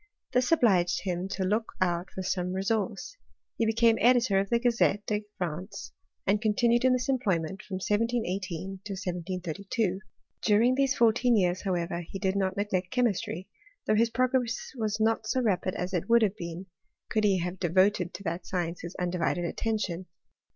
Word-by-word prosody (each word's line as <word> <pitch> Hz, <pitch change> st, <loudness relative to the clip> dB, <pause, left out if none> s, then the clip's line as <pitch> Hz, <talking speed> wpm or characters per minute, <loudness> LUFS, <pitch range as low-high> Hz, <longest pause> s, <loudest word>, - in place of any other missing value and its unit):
This 250 Hz, +2 st, +2 dB
obliged 190 Hz, -, +3 dB
him 180 Hz, -1 st, -2 dB
to 195 Hz, 0 st, -3 dB
look 215 Hz, +4 st, 0 dB
ouSfc 180 Hz, +1 st, -1 dB
some 180 Hz, -1 st, -1 dB
resource: 195 Hz, -, -2 dB, 0.4 s
he 225 Hz, -, +2 dB
became 225 Hz, 0 st, +3 dB
editor 240 Hz, -5 st, +4 dB
of 195 Hz, 0 st, -1 dB
the 235 Hz, -, +3 dB
Grazetfa 215 Hz, -3 st, +1 dB
France, 180 Hz, +3 st, -5 dB, 0.3 s
and 205 Hz, +2 st, +2 dB
continued 235 Hz, +2 st, +2 dB
in 260 Hz, 0 st, +5 dB
this 250 Hz, 0 st, 0 dB
employment 195 Hz, -, 0 dB
from 190 Hz, -, -7 dB
1 210 Hz, +2 st, +2 dB
to 245 Hz, -, -3 dB
1732. 190 Hz, +1 st, -3 dB, 0.4 s
During 225 Hz, +4 st, +4 dB
these 270 Hz, 0 st, +2 dB
fourteen 235 Hz, +1 st, +4 dB
years, 180 Hz, -2 st, +1 dB
howevrffc 175 Hz, -1 st, -3 dB
did 190 Hz, -1 st, 0 dB
not 190 Hz, -1 st, 0 dB
neglect 190 Hz, -3 st, -1 dB
chemistry, 205 Hz, -7 st, -1 dB, 0.4 s
though -, -, +2 dB
his 230 Hz, +2 st, +3 dB
progreil"' 255 Hz, 0 st, +1 dB, 0.5 s
not 220 Hz, 0 st, +1 dB
so 260 Hz, -, +1 dB
rapid 190 Hz, -6 st, 0 dB
as 180 Hz, +2 st, -3 dB
it 175 Hz, +4 st, -2 dB
would 235 Hz, 0 st, +6 dB
have 205 Hz, -2 st, +1 dB
been, 170 Hz, +2 st, -6 dB, 0.5 s
could 215 Hz, -1 st, +1 dB
he 195 Hz, -3 st, +3 dB
ha^ 175 Hz, 0 st, -2 dB
voted 185 Hz, -1 st, +3 dB
to 200 Hz, -, -8 dB
that 170 Hz, 0 st, -4 dB
science 175 Hz, -2 st, -2 dB
his 170 Hz, +1 st, -7 dB
undivided 175 Hz, -1 st, -1 dB
attention. 190 Hz, -2 st, -2 dB
195 Hz, 160 wpm, -28 LUFS, 180-225 Hz, 0.5 s, would